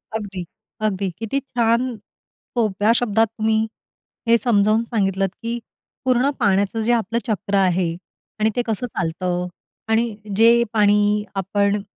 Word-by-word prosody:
अगदी, 195 Hz, -5 st, -4 dB, 0.4 s
अगदी. 200 Hz, -2 st, 0 dB
किती 225 Hz, +5 st, -1 dB
छान, 240 Hz, -1 st, +1 dB, 0.7 s
सोप्या 210 Hz, -1 st, +2 dB
शब्दात 225 Hz, -1 st, +2 dB
तुम्ही 220 Hz, 0 st, +2 dB, 0.6 s
हे 235 Hz, 0 st, +6 dB
समजावून 220 Hz, -2 st, +2 dB
सांगितलंत, 195 Hz, -4 st, 0 dB
की 235 Hz, +1 st, -2 dB, 0.5 s
पूर्ण 255 Hz, +2 st, +3 dB
पाण्याचं 200 Hz, +3 st, +2 dB
जे 230 Hz, -, +1 dB
आपलं 230 Hz, 0 st, 0 dB
चक्र 205 Hz, -2 st, -1 dB
आहे 180 Hz, -3 st, +2 dB, 0.4 s
आणि 215 Hz, +1 st, +3 dB
ते 245 Hz, -, +2 dB
कसं 225 Hz, +2 st, -2 dB
चालतं. 180 Hz, -1 st, -2 dB, 0.4 s
आणि 225 Hz, -1 st, +1 dB, 0.2 s
जे 230 Hz, +2 st, +6 dB
पाणी 210 Hz, 0 st, +3 dB
आपण 200 Hz, +1 st, +1 dB
215 Hz, 125 wpm, -21 LUFS, 195-230 Hz, 0.7 s, हे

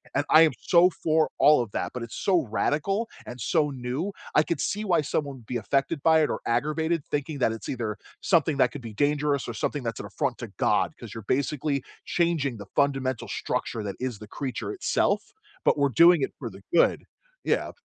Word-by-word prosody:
And 145 Hz, -, +1 dB
I 160 Hz, -, +8 dB
am 160 Hz, -, +6 dB
so 180 Hz, +1 st, +5 dB
for 160 Hz, 0 st, +3 dB
all 150 Hz, -3 st, +6 dB
of 115 Hz, -4 st, -5 dB
that, -, -, -3 dB
but 125 Hz, -2 st, -4 dB
it's 115 Hz, -, -8 dB
so 175 Hz, -8 st, +2 dB
radical 175 Hz, -, 0 dB, 0.2 s
and 125 Hz, +1 st, -8 dB
so 150 Hz, +6 st, +1 dB
new, 135 Hz, +8 st, -3 dB, 0.2 s
I 150 Hz, -, +6 dB
could 170 Hz, -, -2 dB
see 210 Hz, +2 st, -1 dB
why 170 Hz, -5 st, +3 dB
someone 140 Hz, -1 st, -2 dB
would 115 Hz, -, -16 dB
be 125 Hz, -, -3 dB
affected 140 Hz, +6 st, 0 dB
by 160 Hz, -1 st, +5 dB
it -, -, +1 dB
or -, -, -2 dB
aggravated 155 Hz, +6 st, 0 dB
thinking 145 Hz, 0 st, -3 dB
that 115 Hz, -, +2 dB
it's 115 Hz, -, -7 dB
either 115 Hz, -5 st, -3 dB, 0.3 s
something 160 Hz, -5 st, +2 dB
that 125 Hz, -, +3 dB
could 145 Hz, -, -8 dB
be 115 Hz, -2 st, -8 dB
dangerous 145 Hz, +2 st, +1 dB
or 120 Hz, -, -4 dB
something 145 Hz, +4 st, -2 dB
that's 115 Hz, -2 st, -3 dB
an -, -, -6 dB
affront -, -, -2 dB
to -, -, -5 dB
God -, -, +2 dB
'cause -, -, -9 dB
you're 115 Hz, -2 st, -7 dB
basically 140 Hz, 0 st, 0 dB, 0.2 s
changing 160 Hz, -8 st, 0 dB
the 100 Hz, -, -8 dB
fundamental 135 Hz, -3 st, 0 dB
structure 110 Hz, -, -3 dB
that 100 Hz, -2 st, -4 dB
is 125 Hz, -5 st, -3 dB
the 105 Hz, -, -10 dB
creature 135 Hz, -, -4 dB
itself, 390 Hz, -, +1 dB, 0.4 s
but -, -, +4 dB
we're 140 Hz, -1 st, +3 dB
doing 170 Hz, +5 st, +6 dB
it -, -, -1 dB
for 120 Hz, -5 st, -5 dB
the 95 Hz, 0 st, -13 dB
good. 170 Hz, -, +4 dB, 0.4 s
Yeah. -, -, 0 dB
140 Hz, 210 wpm, -26 LUFS, 125-160 Hz, 0.4 s, I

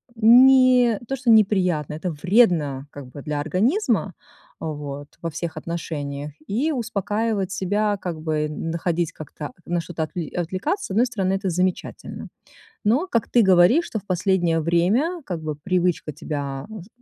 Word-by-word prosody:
не 250 Hz, 0 st, +6 dB
то, 270 Hz, -, -1 dB
что 250 Hz, -2 st, -2 dB
неприятно, 185 Hz, -9 st, +3 dB
это 165 Hz, +4 st, -3 dB
вредно 155 Hz, -, +2 dB
как 140 Hz, -3 st, -9 dB
бы 140 Hz, +2 st, -10 dB
для 150 Hz, 0 st, -3 dB
организма, 220 Hz, -, +1 dB, 0.5 s
вот, 145 Hz, -2 st, -5 dB
во 165 Hz, -, -2 dB
всех 165 Hz, +1 st, -5 dB
отношениях. 150 Hz, -4 st, -5 dB, 0.2 s
И 265 Hz, +11 st, 0 dB
успокаивать 215 Hz, -4 st, -1 dB
себя, 205 Hz, +2 st, 0 dB
как 170 Hz, -3 st, -4 dB
бы 155 Hz, -1 st, -1 dB
н 155 Hz, +2 st, -4 dB
находить 170 Hz, 0 st, -1 dB
как-то, 150 Hz, -2 st, -8 dB
на 175 Hz, 0 st, -1 dB
что-то 165 Hz, -2 st, -4 dB
отвл 170 Hz, +2 st, -4 dB
отвлекаться, 190 Hz, -, -2 dB
с -, -, -8 dB
одной 225 Hz, +6 st, +3 dB
стороны 195 Hz, -6 st, -1 dB
это 195 Hz, -1 st, -1 dB
замечательно. 180 Hz, +1 st, -3 dB, 0.6 s
Но, 260 Hz, -, +2 dB
как 230 Hz, -, 0 dB
ты 240 Hz, -, +4 dB
говоришь, 190 Hz, -, +5 dB
что 220 Hz, -, -4 dB
в 205 Hz, -, -21 dB
последнее 175 Hz, -3 st, +1 dB
время, 210 Hz, -, +1 dB
как 175 Hz, -4 st, -4 dB
бы, 155 Hz, -1 st, -4 dB
привычка 180 Hz, -2 st, -1 dB
тебя, 140 Hz, -2 st, -5 dB
а, 215 Hz, -4 st, -8 dB
с -, -, -17 dB
180 Hz, 160 wpm, -23 LUFS, 155-220 Hz, 0.6 s, не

